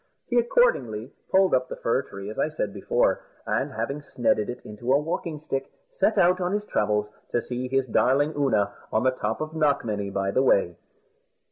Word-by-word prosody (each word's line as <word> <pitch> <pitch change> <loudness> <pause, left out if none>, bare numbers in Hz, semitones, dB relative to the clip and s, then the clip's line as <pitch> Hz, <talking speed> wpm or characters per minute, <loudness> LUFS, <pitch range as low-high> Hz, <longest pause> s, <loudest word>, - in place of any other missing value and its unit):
He 245 -1 +2
accordingly 130 - +1 0.2
pulled 190 -1 +4
up 130 0 +2
the - - -4
fir 115 +3 0
tree, 100 -5 -8
as - - -7
I - - +2
said 105 -10 -3
before, - - +1 0.2
and - - -1
having 145 +2 -3
snedded 115 -6 0
it 125 +1 -5
into 115 +4 -4
a 135 - +6
walking 155 0 -3
stick, 135 -3 -3 0.2
set 335 - +1
out 180 0 +4
on 180 +2 0
his 210 0 -1
travels 105 - 0 0.2
to - - +1
see 125 +1 -4
his 135 0 +1
darling 140 +5 +2
Oonagh 110 -9 +1 0.2
on 110 - +1
the 130 - +4
top 110 -2 -3
of 155 0 -3
Knockmany, 130 -10 0
by 100 0 -1
the 130 - +2
way. 95 -9 +3
130 Hz, 195 wpm, -26 LUFS, 110-155 Hz, 0.2 s, a